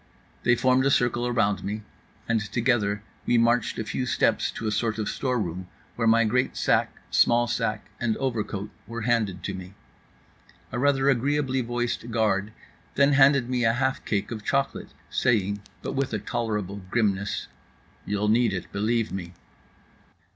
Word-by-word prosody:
They 120 Hz, -, +4 dB
formed 130 Hz, +2 st, +3 dB
a -, -, +4 dB
circle 120 Hz, -2 st, +2 dB
around 110 Hz, -5 st, +1 dB
me; 105 Hz, +2 st, -4 dB, 0.4 s
and 115 Hz, -2 st, +1 dB
together 105 Hz, -2 st, 0 dB, 0.2 s
we 120 Hz, -, +4 dB
marched 115 Hz, 0 st, +2 dB
a -, -, -2 dB
few 125 Hz, +4 st, -3 dB
steps -, -, +2 dB
to 115 Hz, -, -6 dB
a 110 Hz, -, 0 dB
sort 110 Hz, +1 st, 0 dB
of 110 Hz, -, -2 dB
storeroom, 95 Hz, -9 st, -2 dB, 0.3 s
where 115 Hz, -1 st, 0 dB
my 115 Hz, +1 st, +5 dB
great 125 Hz, +4 st, 0 dB
sack, -, -, +2 dB, 0.2 s
small 120 Hz, 0 st, +4 dB
sack, 110 Hz, -3 st, -2 dB
and 115 Hz, -2 st, 0 dB
overcoat 110 Hz, -5 st, -3 dB, 0.2 s
were 115 Hz, 0 st, -5 dB
handed 110 Hz, -6 st, 0 dB
to 100 Hz, -, -3 dB
me. 95 Hz, +1 st, -9 dB, 1.0 s
A 120 Hz, -, -2 dB
rather 135 Hz, 0 st, +2 dB
agreeably 135 Hz, 0 st, +1 dB
voiced 120 Hz, 0 st, -2 dB
guard 110 Hz, -2 st, +1 dB, 0.4 s
then 140 Hz, +1 st, +4 dB
handed 135 Hz, -2 st, +5 dB
me 125 Hz, -1 st, 0 dB
a 115 Hz, 0 st, +4 dB
half 130 Hz, +2 st, 0 dB
cake 105 Hz, 0 st, -1 dB
of 110 Hz, -3 st, -5 dB
chocolate, 135 Hz, +3 st, -1 dB, 0.2 s
saying 100 Hz, -4 st, +1 dB, 0.2 s
(but -, -, -3 dB
with 135 Hz, -3 st, -1 dB
a -, -, +1 dB
tolerable 105 Hz, -3 st, -3 dB
grimness): 100 Hz, -3 st, 0 dB, 0.6 s
"You'll 105 Hz, +1 st, -1 dB
need 115 Hz, 0 st, +3 dB
it, 95 Hz, -, -5 dB
believe 110 Hz, +2 st, 0 dB
me." 90 Hz, -2 st, -6 dB
115 Hz, 160 wpm, -26 LUFS, 105-125 Hz, 1.0 s, my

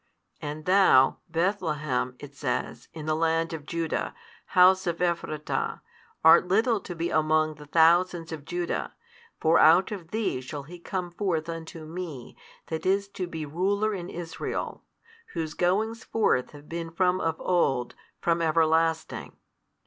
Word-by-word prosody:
And 150 Hz, +1 st, -6 dB
thou, 185 Hz, -9 st, +5 dB
Bethlehem, 155 Hz, -8 st, -1 dB
it 145 Hz, +1 st, -11 dB
says, 135 Hz, -3 st, -3 dB
in 155 Hz, -2 st, -8 dB
the 155 Hz, -, +1 dB
land 165 Hz, +1 st, +1 dB
of 150 Hz, -2 st, -7 dB
Judah, 165 Hz, -2 st, -2 dB, 0.4 s
house 185 Hz, +1 st, +6 dB
of 170 Hz, -1 st, -1 dB
Ephrata, 170 Hz, -4 st, -2 dB, 0.4 s
art 160 Hz, +2 st, +7 dB
little 220 Hz, +4 st, +2 dB
to 180 Hz, -2 st, -8 dB
be 170 Hz, +1 st, -2 dB
among 155 Hz, 0 st, +2 dB
the 150 Hz, -1 st, -13 dB
thousands 170 Hz, +2 st, +3 dB
of 155 Hz, -3 st, -6 dB
Judah, 175 Hz, +2 st, -3 dB, 0.4 s
for 160 Hz, +1 st, +4 dB
out 170 Hz, +7 st, +6 dB
of 180 Hz, -6 st, -6 dB
thee 215 Hz, -, -1 dB
shall 140 Hz, +2 st, -6 dB
He 175 Hz, +5 st, -11 dB
come 180 Hz, 0 st, -4 dB
forth 170 Hz, -4 st, -1 dB
unto 165 Hz, -1 st, -7 dB
Me 160 Hz, -6 st, -7 dB, 0.3 s
That 160 Hz, -1 st, -4 dB
is 200 Hz, +1 st, +2 dB
to 190 Hz, -2 st, -4 dB
be 160 Hz, -2 st, -5 dB
ruler 200 Hz, +8 st, 0 dB
in 180 Hz, -3 st, -5 dB
Israel, 165 Hz, -1 st, -5 dB, 0.5 s
Whose 160 Hz, -2 st, -3 dB
goings 215 Hz, +7 st, 0 dB
forth 125 Hz, -, +1 dB
have 145 Hz, 0 st, -14 dB
been 165 Hz, 0 st, -5 dB
from 180 Hz, +2 st, +1 dB
of 160 Hz, -1 st, -1 dB
old, 135 Hz, -9 st, +1 dB, 0.3 s
from 170 Hz, 0 st, +1 dB
everlasting. 160 Hz, 0 st, +1 dB
165 Hz, 150 wpm, -27 LUFS, 155-180 Hz, 0.5 s, art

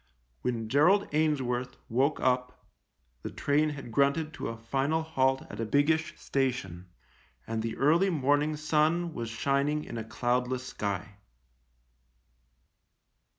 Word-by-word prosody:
When 115 Hz, -3 st, -2 dB
Gerald 170 Hz, -, +4 dB
Ainsworth 130 Hz, -5 st, 0 dB
woke 135 Hz, +6 st, +1 dB
up 125 Hz, 0 st, 0 dB, 0.6 s
the -, -, -5 dB
train 150 Hz, +2 st, +1 dB
had 140 Hz, -5 st, -7 dB
grunted 140 Hz, +5 st, +1 dB
to -, -, -5 dB
a 115 Hz, -, -5 dB
final 135 Hz, +7 st, 0 dB
halt 135 Hz, -4 st, +1 dB
at 105 Hz, -, -8 dB
a -, -, 0 dB
biggish 155 Hz, +6 st, +1 dB
station, 100 Hz, -10 st, -2 dB, 0.6 s
and 115 Hz, -1 st, -2 dB
the 115 Hz, 0 st, -4 dB
early 165 Hz, +7 st, +4 dB
morning 145 Hz, -1 st, +1 dB
sun 155 Hz, +3 st, +1 dB
was 115 Hz, -4 st, -4 dB
shining 140 Hz, +6 st, 0 dB
in 115 Hz, -, -6 dB
a -, -, -4 dB
cloudless 125 Hz, +2 st, -1 dB
sky. 100 Hz, -3 st, -4 dB
135 Hz, 125 wpm, -29 LUFS, 120-150 Hz, 0.6 s, Gerald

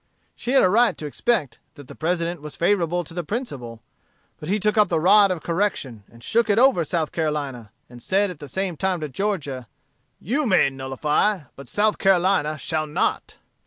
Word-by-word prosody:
She 245 Hz, -, -3 dB
had 270 Hz, -, +5 dB
a -, -, +6 dB
right 235 Hz, +4 st, +3 dB
to 155 Hz, -, -6 dB
expect 150 Hz, -, -1 dB, 0.2 s
that 145 Hz, -2 st, -13 dB
the -, -, -10 dB
President 170 Hz, 0 st, -2 dB
was 150 Hz, 0 st, -7 dB
favorable 175 Hz, -1 st, +1 dB
to 165 Hz, -, -11 dB
the 175 Hz, 0 st, -3 dB
principle: 140 Hz, -, -6 dB, 0.6 s
but 155 Hz, -, -7 dB
he 205 Hz, +2 st, +1 dB
took 210 Hz, +1 st, +1 dB
up 210 Hz, -1 st, +4 dB
the 165 Hz, -, 0 dB
rod 200 Hz, +4 st, +6 dB
of 180 Hz, -4 st, -3 dB
correction, 165 Hz, -, -2 dB
and 115 Hz, 0 st, -16 dB
shook 230 Hz, -, +1 dB
it 205 Hz, -, +3 dB
over 245 Hz, -8 st, +4 dB
South 160 Hz, -1 st, -2 dB
Carolina, 145 Hz, -8 st, -3 dB, 0.2 s
and 120 Hz, 0 st, -13 dB
said 195 Hz, -, +1 dB
at 165 Hz, -, -11 dB
the 145 Hz, -, -9 dB
same 190 Hz, +2 st, -2 dB
time 190 Hz, 0 st, 0 dB
to 150 Hz, -, -4 dB
Georgia, 145 Hz, -, -3 dB, 0.5 s
'You 270 Hz, -, -1 dB
may 185 Hz, -9 st, +4 dB
nullify, 150 Hz, +9 st, 0 dB
but 140 Hz, -, -11 dB
South 210 Hz, +1 st, +1 dB
Carolina 185 Hz, -5 st, +2 dB
shall 155 Hz, +2 st, -2 dB
not.' 150 Hz, -, -2 dB
170 Hz, 195 wpm, -23 LUFS, 145-205 Hz, 0.6 s, a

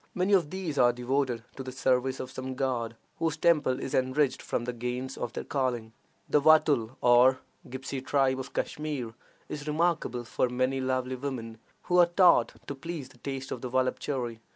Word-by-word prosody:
Many 185 Hz, +3 st, +1 dB
of 175 Hz, -7 st, +4 dB
these 175 Hz, -6 st, -3 dB
are 120 Hz, 0 st, +6 dB
devoted 125 Hz, -1 st, -1 dB
to -, -, -6 dB
the 130 Hz, -1 st, -6 dB
service 130 Hz, 0 st, +1 dB
of 130 Hz, -, -5 dB
some 130 Hz, 0 st, -5 dB
god, 120 Hz, -4 st, -1 dB, 0.2 s
whose 165 Hz, -1 st, 0 dB
temple 150 Hz, -6 st, +3 dB
is 135 Hz, -, -5 dB
enriched 130 Hz, +2 st, +1 dB
from 120 Hz, -, -2 dB
the 125 Hz, -, -3 dB
gains 125 Hz, +2 st, -4 dB
of 120 Hz, -, -4 dB
their -, -, -4 dB
calling. 120 Hz, -5 st, -2 dB, 0.3 s
The 150 Hz, -, +3 dB
Watul, 140 Hz, -6 st, +4 dB
or 125 Hz, +2 st, +6 dB, 0.3 s
Gipsy 130 Hz, +1 st, -5 dB
tribe 135 Hz, -1 st, +1 dB
of 130 Hz, -, -6 dB
Kashmir 145 Hz, -7 st, -3 dB, 0.3 s
is 150 Hz, 0 st, -6 dB
remarkable 155 Hz, -5 st, 0 dB
for 120 Hz, +2 st, 0 dB
many 130 Hz, +2 st, 0 dB
lovely 130 Hz, 0 st, -1 dB
women, 120 Hz, -4 st, -5 dB, 0.2 s
who 180 Hz, 0 st, +2 dB
are 175 Hz, -, +7 dB
taught 175 Hz, +1 st, +5 dB
to -, -, -4 dB
please 145 Hz, -1 st, -6 dB
the 125 Hz, -, -20 dB
taste 135 Hz, 0 st, -5 dB
of 120 Hz, -, -4 dB
the 125 Hz, -, -4 dB
voluptuary. 130 Hz, -2 st, -1 dB
130 Hz, 180 wpm, -29 LUFS, 125-145 Hz, 0.3 s, are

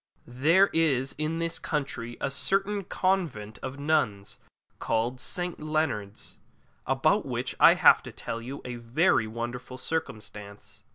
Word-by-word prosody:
There 160 Hz, +11 st, +3 dB
is 135 Hz, -5 st, +2 dB
in 155 Hz, +2 st, -1 dB
this 165 Hz, 0 st, -1 dB
country 120 Hz, -6 st, -3 dB
a -, -, -1 dB
certain 195 Hz, +7 st, +1 dB
Convent 165 Hz, -, -1 dB
of 130 Hz, +1 st, -5 dB
Nuns 140 Hz, -10 st, 0 dB, 0.4 s
called 115 Hz, +3 st, -1 dB
St. 175 Hz, +3 st, -3 dB
Leonard's, 155 Hz, -10 st, -2 dB, 0.5 s
about -, -, +2 dB
which -, -, -2 dB
I -, -, +8 dB
have -, -, +6 dB
to -, -, -9 dB
tell 115 Hz, -, -5 dB
you 130 Hz, +4 st, -7 dB
a 125 Hz, -1 st, -5 dB
very 120 Hz, 0 st, +2 dB
wonderful 120 Hz, +3 st, -5 dB
circumstance. 105 Hz, -8 st, -6 dB
130 Hz, 130 wpm, -28 LUFS, 115-160 Hz, 0.5 s, I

